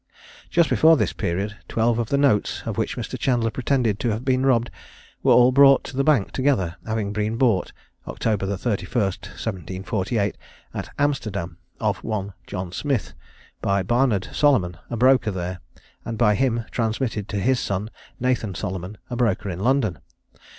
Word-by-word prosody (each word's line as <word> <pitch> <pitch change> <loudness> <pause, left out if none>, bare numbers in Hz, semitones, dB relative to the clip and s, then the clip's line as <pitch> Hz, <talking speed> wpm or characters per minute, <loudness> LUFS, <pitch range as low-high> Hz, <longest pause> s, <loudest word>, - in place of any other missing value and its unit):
Just 170 -2 +3
before 160 0 +5
this - - 0
period, 100 +5 -2
twelve 115 +1 +1
of 115 - -2
the 140 - +2
notes 140 -7 +2
of - - -3
which - - -2
Mr. - - -5
Chandler 120 -3 +1
pretended 120 -3 0
to 120 - 0
have 110 +4 -3
been 130 0 +2
robbed, 120 -3 +2 0.5
were - - +3
all 125 +1 +7
brought 135 0 +6
to - - -8
the 135 - +2
bank 140 -9 +3
together, 130 -11 +1
having 110 -2 -2
been 105 +1 -1
bought, 115 -8 +2 0.4
October 105 -3 -1
31, 120 +3 -1
1748, 95 +2 -3 0.4
at - - -5
Amsterdam, 100 - -1 0.2
of - - -1
one 100 -3 -3
John 90 -2 -5
Smith, 135 +3 -2 0.5
by 100 -1 +1
Barnard 120 -2 +1
Solomon, 120 - +3
a 120 - -3
broker 125 -1 +4
there, 90 -2 -4 0.4
and 115 - -5
by 105 -2 +4
him 120 -1 0
transmitted 110 -2 -2
to 100 - -2
his 130 +5 +2
son, 100 +3 -3 0.3
Nathan 120 -6 0
Solomon, 95 +1 -5
a - - -2
broker 105 -5 0
in 85 - -6
London. 120 -5 +1
110 Hz, 160 wpm, -23 LUFS, 100-130 Hz, 0.5 s, all